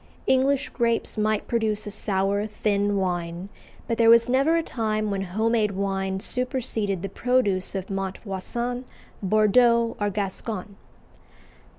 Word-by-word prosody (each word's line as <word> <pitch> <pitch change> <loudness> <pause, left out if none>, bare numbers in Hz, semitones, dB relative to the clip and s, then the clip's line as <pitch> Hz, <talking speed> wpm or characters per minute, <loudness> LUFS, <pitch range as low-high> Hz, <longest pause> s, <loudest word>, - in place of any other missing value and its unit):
English 270 +2 +2
grapes 235 -2 0
might 215 -1 0
produce 220 -2 0
a 205 - -5
sour, 200 +1 -1
thin 205 -1 0
wine, 175 0 -2 0.4
but 230 - -2
there 230 -1 +6
was 230 0 +7
never 270 +6 +3
a 330 - 0
time 215 -5 -2
when 195 -1 -1
home 215 +5 -1
made 215 -3 +1
wine 195 0 -2
superseded 225 -6 0
the - - -1
produce 200 -4 0
of 190 -1 -3
Montvoisin, 195 +6 -4 0.4
Bordeaux, 230 +3 +3
or 205 -1 +1
Gascony. 200 0 -4
210 Hz, 130 wpm, -25 LUFS, 195-235 Hz, 0.4 s, was